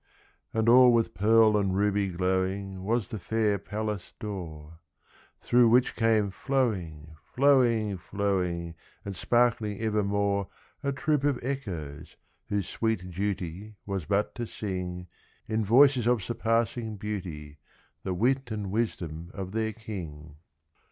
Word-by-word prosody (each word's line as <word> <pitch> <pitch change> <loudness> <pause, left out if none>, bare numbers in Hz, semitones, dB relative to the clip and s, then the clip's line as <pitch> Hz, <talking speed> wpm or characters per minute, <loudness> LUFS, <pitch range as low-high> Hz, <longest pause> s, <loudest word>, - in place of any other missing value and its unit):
And 110 0 0
all 125 +1 +8
with 115 -1 +2
pearl 110 +3 +5
and 100 -2 +1
ruby 100 0 +2
glowing 95 +1 -1
Was 110 0 -1
the 110 - -4
fair 105 +2 0
palace 105 -2 -5
door, 80 -6 -7 0.6
Through 120 -1 +4
which 125 +2 +3
came 110 -3 +2
flowing, 95 - -2
flowing, 120 -7 +3
flowing, 90 -3 -2 0.3
And 100 -1 -5
sparkling 115 -1 +1
evermore, 100 -2 0 0.3
A 140 -1 -1
troop 145 +1 0
of 145 -3 +2
Echoes, 85 - -5 0.3
whose 100 -2 -1
sweet 110 -5 -2
duty 95 +2 -4
Was 95 -5 -3
but 100 +3 0
to 120 -1 -4
sing, 90 -4 -5 0.4
In 110 0 0
voices 125 +2 +5
of 120 -5 +2
surpassing 115 0 -1
beauty, 85 -8 -6 0.4
The 95 - -3
wit 130 +6 +1
and 105 -3 -4
wisdom 85 -7 -3
of 95 -2 -5
their 110 +1 -1
king. 80 -10 -8
105 Hz, 125 wpm, -28 LUFS, 90-115 Hz, 0.6 s, all